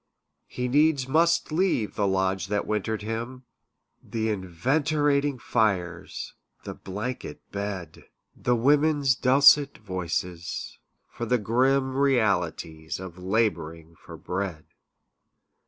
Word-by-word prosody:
He 125 0 -3
needs 145 0 +3
must 165 +4 +2
leave 160 - +1
the 100 -2 0
lodge 95 -1 0
that 105 +1 -1
wintered 110 0 -2
him, 120 +4 -5 0.6
The 110 -1 -2
enervating 140 - 0
fires, 95 -8 -1 0.3
the - - -6
blanket 105 +7 -6
bed 100 -5 -5 0.3
The 125 - +1
women's 145 +2 +3
dulcet 140 +3 +5
voices, 90 -3 -4 0.3
for 120 - -6
the 125 - +3
grim 130 +4 +1
Realities 90 - 0
of 95 -1 -9
labouring 85 -5 -1
for - - -12
bread. 90 -4 -4
110 Hz, 105 wpm, -26 LUFS, 95-135 Hz, 0.6 s, dulcet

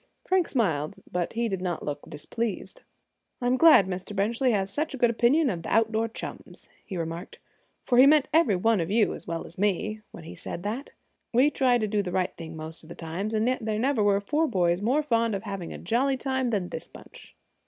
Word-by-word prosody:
Frank 370 -2 +2
smiled, 160 - 0 0.2
but 175 -1 -2
he 235 +1 0
did 190 -4 -3
not 175 -3 -3
look 145 -1 -5
displeased. 230 - -4 0.6
"I'm 245 +1 +1
glad 305 - +7
Mr. 185 +2 -5
Benchley 230 +6 +1
has 195 -3 0
such 305 -1 -2
a - - -7
good 240 -2 +3
opinion 250 +7 +3
of 170 -3 -4
the - - -6
outdoor 225 0 +2
chums," 225 - -8 0.2
he 190 - -6
remarked, 165 +1 -5 0.5
"for 245 -1 +3
he 265 - +9
meant 300 -1 +5
every 315 - +4
one 225 +3 +2
of 165 - -3
you, 215 +1 +2
as - - -9
well 165 -1 -4
as 170 - -13
me, 210 +2 0
when 170 - -11
he 160 - -9
said 175 - -7
that. 230 +7 -4 0.4
We 265 +5 +4
try 255 -4 +3
to 215 -2 -1
do 210 0 +1
the 185 -3 -4
right 185 0 -1
thing 160 -1 -8
most 160 +1 -8 0.2
times; 185 +7 -4
and 220 +2 +1
yet 255 -2 0
there 215 -1 -1
never 255 0 +1
were 200 -1 +3
four 300 +10 0
boys 175 - +1
more 260 +8 +2
fond 230 -5 +1
of 195 - -5
having 195 -5 -5
a - - -6
jolly 260 +8 0
time 260 -1 -1
than 195 -6 -1
this - - -6
bunch." - - -14
215 Hz, 215 wpm, -27 LUFS, 185-250 Hz, 0.6 s, he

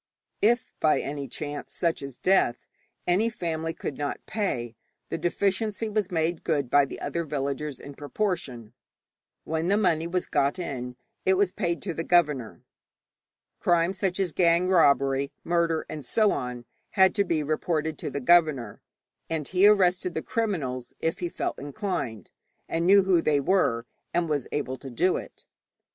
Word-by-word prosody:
If 240 +4 +2
by 155 - +3
any 140 -1 -4
chance, 145 +3 -6
such 170 -2 0
as 135 -3 -7
death, 185 -10 +2 0.4
any 195 +6 +2
family 165 -6 -3
could 145 -3 -6
not 145 -1 -3
pay, 120 - -2 0.3
the - - -2
deficiency 205 +4 0
was 210 -3 0
made 165 -1 -1
good 140 -5 0
by 145 -1 +6
the - - -8
other 170 - -2
villagers 140 -1 -3
in 140 - -9
proportion. 145 - -3 0.7
When 160 +1 -2
the 200 +2 +3
money 170 -6 +2
was 180 +1 -1
got 140 +5 +1
in 125 -8 -5 0.3
it 190 - +3
was 190 -1 +2
paid 175 -5 -2
to 185 -3 -3
the 165 - -3
governor. 150 -10 +1 1.0
Crime 175 +1 +2
such 190 -1 -1
as 190 -3 0
gang 170 0 +3
robbery, 140 -5 +3
murder, 170 -2 +1
and 150 -2 -6
so 215 +5 +3
on, 125 -1 -4 0.3
had 190 0 +6
to 200 - +2
be 165 -5 0
reported 155 +1 -1
to - - -3
the 140 - -3
governor, 145 -7 +3 0.5
and 160 -3 -2
he 190 +2 +5
arrested 185 -3 +3
the 160 - -2
criminals 135 - -2
if 165 - -1
he 175 - -2
felt - - -3
inclined, 140 - -4 0.4
and 165 +1 -1
knew 200 +1 +7
who 185 -3 +3
they 150 -3 +2
were, 135 -7 +1 0.3
and 175 -1 +2
was 145 -4 -1
able 130 -3 -2
to 135 - -9
do 175 +9 +1
it. - - -10
165 Hz, 165 wpm, -26 LUFS, 140-185 Hz, 1.0 s, knew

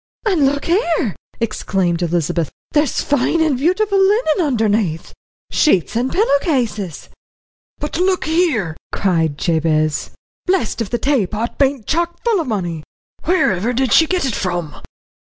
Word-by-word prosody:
"And 345 -10 +3
look 280 +1 -1
here!" 335 - +1 0.2
exclaimed 190 -6 -1
Elizabeth, 170 -2 -1 0.2
"there's 295 -3 +1
fine 290 +3 +1
and 315 -4 +2
beautiful 390 +9 +1
linen 385 -4 +3
underneath 215 - 0 0.4
sheets 210 - +2
and 245 +3 0
pillow 360 -8 +3
cases." 225 - -2 0.7
"But 300 +2 -4
look 370 0 +1
here!" 310 - +1 0.2
cried 165 -6 0
Jabez, 155 -2 0 0.4
"blessed 360 - 0
if 215 - -3
the 240 - 0
taypot 230 -4 -1
bain't 275 -5 +1
chock 340 +2 -1
full 450 -6 +2
o' - - -4
money! 175 - -3 0.5
Whereiver 240 - +2
did 255 -1 +1
she 320 - +6
get 365 -3 0
it 260 - -1
from?" 175 -6 -3
245 Hz, 135 wpm, -18 LUFS, -, 0.7 s, she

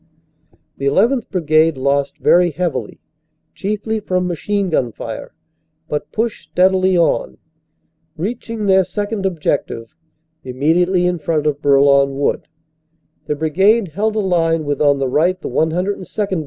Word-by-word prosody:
The 140 0 +1
1 200 +10 +3
1th. - - -34
Brigade 160 -4 +2
lost 140 +1 0
very 175 0 +4
heavily, 175 +1 -3 0.5
chiefly 215 +2 -3
from 185 -3 -1
machine 190 +2 -2
gun 125 -6 0
fire, - - -7 0.6
but 150 - -4
pushed 225 0 -3
steadily 185 0 +3
on. 170 - +1 0.8
Reaching 220 +4 -4
their 190 -1 +4
second 205 +2 -3
ob 175 -4 -5
jective, 115 -6 -2 0.5
immediately 170 +8 +1
in 180 -1 0
front 155 0 -1
of 150 -1 -1
Bourlon 140 -1 +4
Wood, 140 - -1 0.8
the 150 - -1
brigade 190 +7 +2
held 210 +7 -1
a - - +1
line 165 -4 +1
with 145 0 -2
on 145 -1 +4
the 135 -1 -1
right 170 +8 +1
the - - -6
102nd. 185 +3 -1
175 Hz, 140 wpm, -18 LUFS, 150-190 Hz, 0.8 s, very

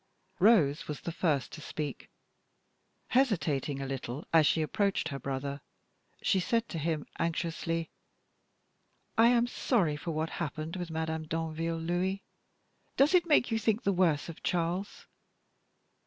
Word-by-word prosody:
Rose 175 -8 +4
was 150 -2 -5
the 170 - -4
first 155 -5 0
to 155 - -9
speak. 150 -1 -5 1.0
Hesitating 155 - +1
a 135 - -3
little 135 +1 -5
as 160 -3 +6
she 160 - +2
approached 195 +1 0
her 140 -3 -5
brother, 140 +2 -4 0.6
she 190 - +3
said 230 +5 0
to 165 - -4
him, 155 -1 -1
anxiously: 165 0 -1 1.2
"I 225 +1 +6
am 240 0 +4
sorry 210 - +1
for 150 - -6
what 160 0 -2
happened 155 0 -4
with 175 -2 -4
Madame 160 0 -3
Danville, 165 +1 -2
Louis. 175 +4 -1 0.7
Does 280 +6 +5
it 350 -2 +4
make 295 -6 +4
you 225 - +1
think 220 +1 +1
the 200 - +2
worse 170 -5 +2
of 165 - -9
Charles?" 175 +3 -2
165 Hz, 140 wpm, -30 LUFS, 155-195 Hz, 1.2 s, as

